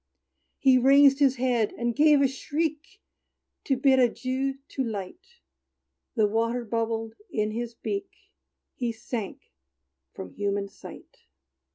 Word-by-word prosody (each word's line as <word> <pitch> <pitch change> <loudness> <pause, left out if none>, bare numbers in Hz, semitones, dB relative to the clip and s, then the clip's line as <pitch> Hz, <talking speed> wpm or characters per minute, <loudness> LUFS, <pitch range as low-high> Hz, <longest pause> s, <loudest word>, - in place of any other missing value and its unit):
He 260 -1 +4
raised 275 +2 +6
his 275 -2 +4
head, 245 -4 0
and 235 -1 -1
gave 295 -1 +5
a - - +5
shriek, 305 +7 -4 0.6
To 270 - +1
bid 265 0 +4
adieu 260 +2 0
to 270 - -2
light: 250 - -7 0.8
The 220 -3 +3
water 230 +3 -1
bubbled 225 0 -2 0.2
in 215 -1 -1
his 235 +1 -5
beak 395 - -4 0.6
He 240 -2 -2
sank 225 -2 -6 0.6
from 90 - -9
human 200 0 -2
sight! - - -13
250 Hz, 125 wpm, -26 LUFS, 225-275 Hz, 0.8 s, raised